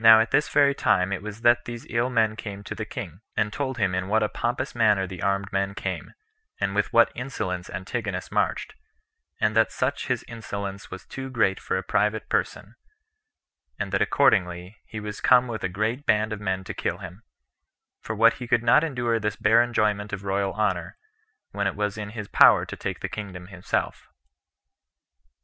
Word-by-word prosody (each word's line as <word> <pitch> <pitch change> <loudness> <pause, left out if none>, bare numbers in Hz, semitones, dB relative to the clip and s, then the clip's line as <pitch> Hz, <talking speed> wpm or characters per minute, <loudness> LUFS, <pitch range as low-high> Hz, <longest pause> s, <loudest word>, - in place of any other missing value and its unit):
Now 110 0 +10
at 115 - +1
this 150 - +2
very 140 -1 +4
time 95 -7 +2
it 95 - -3
was 105 +1 -8
that 120 0 +4
these 120 -1 -7
ill 120 +2 0
men 110 -3 +2
came 100 -2 -7
to - - -6
the - - -5
king, 85 +4 -7 0.2
and 105 0 +1
told 130 -3 -3
him 100 -5 +1
in 95 0 -1
what 110 +2 +2
a 105 - 0
pompous 125 +2 -2
manner 105 -5 +3
the 90 -1 -8
armed 100 0 -1
men 100 0 0
came, 95 -2 -5 0.4
and 100 - 0
with 105 0 0
what 115 - +5
insolence 95 -9 -4
Antigonus 95 - -4
marched, - - 0 0.7
and 110 0 +1
that 110 0 +4
such 130 +2 -2
his 125 -3 -1
insolence 100 -4 -6
was 95 - -9
too 135 0 -7
great 110 -7 +1
for - - -2
a 95 - -3
private 105 +2 0
person, - - -2 1.0
and - - -3
that - - +1
accordingly 90 -7 +2
he 110 - -6
was 105 0 -6
come 125 0 +5
with 115 -2 -5
a - - 0
great 110 +8 -2
band 110 0 +2
of 105 - -5
men 95 -1 -2
to - - -6
kill 85 - -2
him; 95 +1 -10 0.8
for 110 - -5
that 115 +3 +5
he 125 - -6
could 120 -1 +2
not 150 - +5
endure 120 -7 0
this 105 -1 -2
bare 115 +2 +4
enjoyment 105 -3 0
of 100 -1 -5
royal 100 0 -1
honor, 100 -5 -1 0.5
when 100 -1 -1
it - - -2
was 105 -1 -1
in 105 -1 -5
his 105 -2 -5
power - - +6
to - - -7
take - - -5
the - - -2
kingdom 90 -4 -7
himself. 90 -1 -3
105 Hz, 195 wpm, -25 LUFS, 95-115 Hz, 1.0 s, Now